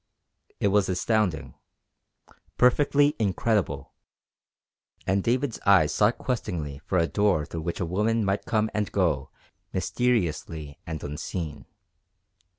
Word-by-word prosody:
It 100 - +2
was 100 -1 +2
astounding. 95 -2 0 1.0
Perfectly 145 +3 +4
incredible. 105 0 0 1.1
And 95 0 +1
David's 125 +1 0
eyes 90 -6 +5
sought 105 +7 +3
questingly 80 - -3
for 90 +5 -2
a 85 - +4
door 95 -4 +1
through 80 - -6
which 85 +1 -3
a 90 - 0
woman 105 +5 +1
might 100 +1 -1
come 110 -1 +1
and 105 -1 -1
go 80 -8 +1 0.4
mysteriously 80 -10 -1
and 80 -2 -5
unseen. 75 +1 -5
95 Hz, 115 wpm, -26 LUFS, 80-110 Hz, 1.1 s, eyes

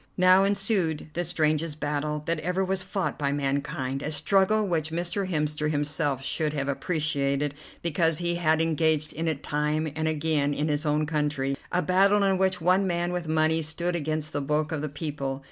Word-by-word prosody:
Now 185 +1 +6
ensued 195 -6 +1
the 175 - -1
strangest 155 -2 0
battle 150 0 -2
that 165 -1 -1
ever 180 +4 -1
was 190 0 -1
fought 190 -2 -3
by 140 -1 0
mankind, 140 -1 -2
a 150 - -3
struggle 195 +7 +2
which 160 -3 0
Mr. 175 +4 -2
Hemster 150 -2 0
himself 145 -2 -1
should 155 0 0
have 140 -2 -2
appreciated 145 -2 0 0.3
because 165 -1 +2
he 175 0 0
had 160 -2 +2
engaged 160 -1 +2
in 165 +1 -3
it 155 -3 -2
time 150 +1 -1
and 160 0 -1
again 150 -2 0
in 150 +2 -1
his 150 +1 -1
own 150 +1 +2
country, 150 -3 -1 0.2
a 180 0 +1
battle 195 +2 +4
in 195 -1 +2
which 190 0 +1
one 185 +3 +3
man 175 0 -1
with 175 -2 -3
money 160 +1 +2
stood 170 +3 -2
against 155 -1 -2
the 145 - -1
bulk 150 +2 0
of 160 -2 -2
the 155 - -3
people. 140 -2 -4
155 Hz, 185 wpm, -26 LUFS, 150-175 Hz, 0.3 s, Now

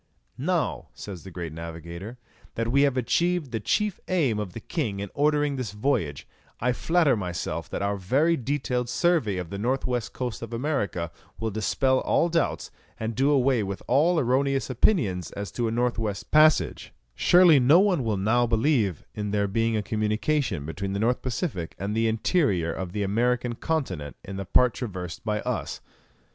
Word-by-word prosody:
"Now," 165 +4 -1
says 95 -5 -8
the 95 - -9
great 85 -3 -6
navigator, 85 +7 -7 0.4
"that 115 0 -1
we 140 +2 +4
have 140 -2 +2
achieved 170 +3 +1
the 115 - -2
chief 210 - 0
aim 145 - +1
of 100 -4 -4
the - - -6
king 110 - -3
in 100 -1 -5
ordering 145 -1 +1
this 115 -6 -4
voyage, 105 - -1 0.3
I 125 +2 +1
flatter 160 0 +2
myself 90 -5 -4
that - - -3
our 100 0 0
very 140 - +2
detailed 125 -2 -2
survey 125 - +1
of 90 -2 -5
the 100 - -4
north 130 +5 0
west 125 -3 -2
coast 125 -3 -4
of 115 0 -7
America 105 - -2 0.3
will 110 -1 -2
dispel 130 +5 +1
all 170 - +2
doubts, 165 -1 -1 0.3
and 110 +1 -2
do 135 +4 +2
away 135 -4 +3
with 100 -1 -4
all 155 +7 +3
erroneous 135 +1 +1
opinions 105 - +1
as 100 0 -5
to 120 -1 -1
a - - -1
north 120 0 0
west 105 -3 -4
passage; 155 0 +4 0.2
surely 175 - +6
no 140 +7 +6
one 190 -8 +2
will 110 -3 0
now 115 +5 +2
believe 115 - +1
in 105 -1 -3
there 100 0 +1
being 115 +2 +1
a 105 - -1
communication 110 - 0
between 95 +5 -4
the 100 - -2
North 120 +3 +1
Pacific 120 - -3
and 100 +3 -3
the 115 0 +2
interior 110 - +1
of 95 -2 -5
the 105 - -1
American 120 +4 +1
continent 115 - -3
in 95 0 -7
the 100 - -4
part 125 +5 +4
traversed 90 -8 -6
by 105 -1 -1
us." - - -3
115 Hz, 180 wpm, -26 LUFS, 100-140 Hz, 0.4 s, surely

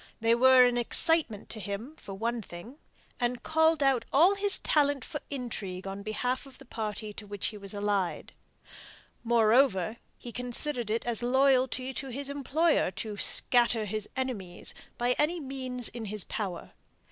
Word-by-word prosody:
They 230 0 +3
were 255 +1 +7
an 245 0 +1
excitement 245 -3 +2
to 220 - -5
him 215 +8 -6
for 195 -10 -9
one 230 +3 -2
thing, 215 - -11 0.4
and 245 0 -1
called 320 -1 +3
out 265 -4 +3
all 340 +8 +5
his 400 0 +4
talent 285 -3 +1
for 295 - -5
intrigue 210 -9 -5
on 195 +1 -5
behalf 245 +6 -2
of 265 - -15
the - - -15
party 215 -2 -5
to 210 0 -9
which 205 -1 -2
he 215 - -9
was 200 -1 -8
allied. 205 -3 -2 0.9
Moreover, 230 -2 +3 0.2
he 240 - -9
considered 245 0 -1
it 225 +2 -1
as 240 -2 0
loyalty 260 +1 +2
to 270 - -5
his 280 +3 -3
employer 290 - +1
to 210 +3 -6
"scatter 235 0 +3
his 215 +1 -4
enemies" 230 -9 -4 0.2
by 240 +1 +1
any 335 +4 +1
means 260 -4 -4
in 235 -2 -6
his 210 -2 -1
power. 190 -6 -5
240 Hz, 160 wpm, -29 LUFS, 210-270 Hz, 0.9 s, were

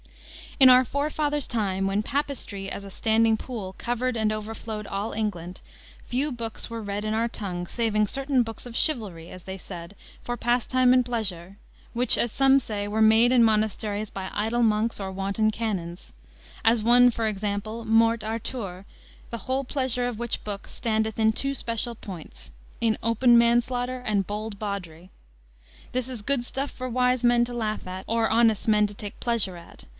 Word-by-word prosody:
"In 265 -1 +9
our 255 0 +7
forefathers' 295 +1 -1
time, 195 -4 -1
when 200 +2 0
Papistry 235 -8 -3
as 200 - -6
a 195 - -9
standing 225 +2 +3
pool 215 -5 -6
covered 245 +1 -1
and 220 -1 +1
overflowed 215 0 -5
all 200 +3 -3
England, 185 -5 -4 0.5
few 275 +4 -1
books 230 -3 -5
were 230 -1 -5
read 200 0 -3
in 215 0 -1
our 230 +1 +1
tongue 185 -6 -5
saving 215 +1 +1
certain 270 +3 +1
books 225 +2 -8
of 235 - -9
chivalry, 205 - -1
as 185 - -11
they 190 0 -6
said, 175 +1 -9 0.3
for 240 0 -3
pastime 250 +1 +3
and 255 0 +4
pleasure, 200 -6 -4 0.4
which, 245 +1 +4
as 240 - +1
some 270 +2 +5
say, 210 -5 -4
were 215 +2 -1
made 220 +2 +6
in 250 -2 +5
monasteries 215 -1 0
by 190 -1 -5
idle 225 +3 0
monks 220 0 +1
or 190 -1 -4
wanton 195 +3 0
canons: 195 -6 -4 0.5
as 225 -1 +3
one, 245 +2 +6
for 230 -2 -1
example, 210 +2 -3
Morte 225 0 +3
Arthure, 215 -4 -4 0.5
the 230 - -4
whole 260 +3 -1
pleasure 260 -2 0
of 235 -3 -5
which 235 -1 -2
book 200 -1 -5
standeth 220 -2 -1
in 220 0 +4
two 275 +5 -1
special 235 -1 -1
points, 170 - -10 0.3
in 225 -2 +1
open 235 +2 +4
manslaughter 245 +2 +2
and 205 -5 -1
bold 210 0 -5
bawdry. 185 -4 -5 0.8
This 255 0 -2
is 245 -4 -6
good 255 +3 +2
stuff 270 +3 -3
for 255 0 -6
wise 250 0 +1
men 240 0 +4
to 245 - -8
laugh 215 -4 -3
at 185 +1 -6
or 225 0 +1
honest 225 -2 +3
men 210 -1 +4
to 205 - -9
take 205 +1 -9
pleasure 220 -7 0
at. 170 - -13
225 Hz, 175 wpm, -26 LUFS, 205-240 Hz, 0.8 s, In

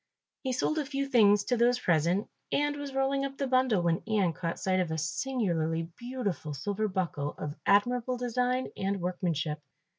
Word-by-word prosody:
He 260 - -2
sold 305 +5 0
a 300 - -1
few 275 0 -1
things 210 -6 +5
to 245 - +1
those 240 +1 +4
present 175 0 +1 0.2
and 290 0 +1
was 285 -1 -5
rolling 270 +1 +1
up 275 0 -4
the 275 - -1
bundle, 255 -7 +2
when 170 -1 +1
Ian 200 -6 +2
caught 165 +1 -3
sight 185 -1 +1
of 180 -3 0
a 160 - -2
singularly 165 - -1
beautiful 235 - -4
silver 205 +8 -1
buckle 170 -7 -2
of 145 - -4
admirable 245 +5 +3
design 250 +1 0
and 195 0 -1
workmanship. 170 -4 -1
205 Hz, 175 wpm, -30 LUFS, 170-255 Hz, 0.2 s, things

